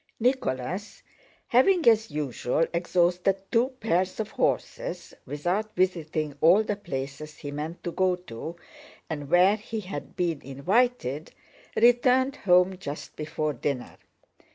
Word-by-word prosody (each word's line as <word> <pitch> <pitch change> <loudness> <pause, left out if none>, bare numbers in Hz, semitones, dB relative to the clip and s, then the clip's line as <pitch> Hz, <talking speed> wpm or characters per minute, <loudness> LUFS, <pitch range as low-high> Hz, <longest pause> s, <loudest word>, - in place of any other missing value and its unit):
Nicholas, 200 - -1 0.5
having 325 +7 +4
as 225 -1 +5
usual 145 0 0
exhausted 175 +2 +2 0.2
two 235 +2 +4
pairs 185 -2 0
of 215 -1 -3
horses, - - -2
without 180 +9 -2
visiting 160 -5 0
all 180 +7 +6
the 210 - -2
places 140 -4 -6
he 145 - -7
meant 155 +4 -5
to 175 - -3
go 185 +1 +2
to 165 -1 -8 0.6
and 145 -3 -4
where 180 +4 +5
he 220 +1 -5
had 190 0 -7
been 170 -5 -1
invited, 155 - 0 0.4
returned 250 +3 +4
home 180 0 +3
just 145 -5 -7
before 155 0 -2
dinner. 130 0 -3
180 Hz, 125 wpm, -27 LUFS, 150-215 Hz, 0.6 s, all